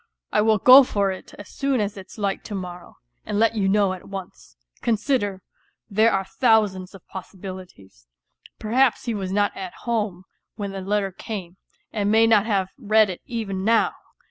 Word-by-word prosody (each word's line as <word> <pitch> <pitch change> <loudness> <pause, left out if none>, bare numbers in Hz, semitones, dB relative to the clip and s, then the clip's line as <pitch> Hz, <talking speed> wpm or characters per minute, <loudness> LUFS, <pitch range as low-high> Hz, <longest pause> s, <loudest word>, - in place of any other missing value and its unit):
I - - +3
will 220 0 +3
go 255 +6 +9
for 200 -5 0
it 185 - -9
as 205 - -11
soon 275 -2 -1
as 205 -1 -2
it's 190 +2 -11
light 200 -2 -2
to 210 - -5
morrow 180 -2 -8 0.3
and 205 - -3
let 225 +1 +3
you 200 -3 0
know 200 -1 +3
at 185 - -10
once. 190 - -9 0.2
Consider, 220 -4 0 0.5
there 220 +3 +4
are 195 0 0
thousands 205 -6 +1
of 195 - -15
possibilities; 185 - -10 0.5
perhaps 245 +3 +1
he 235 - -1
was 190 -3 -4
not 205 +1 +1
at 185 -2 -7
home 210 -6 -1 0.3
when 205 -2 -4
the 195 0 -6
letter 195 0 -1
came, 185 -2 -7 0.4
and 205 -2 0
may 225 +1 +5
not 220 -2 +4
have 195 -4 0
read 215 -3 +3
it 180 - -9
even 210 -6 -3
now 225 +2 +3
205 Hz, 175 wpm, -23 LUFS, 190-220 Hz, 0.5 s, go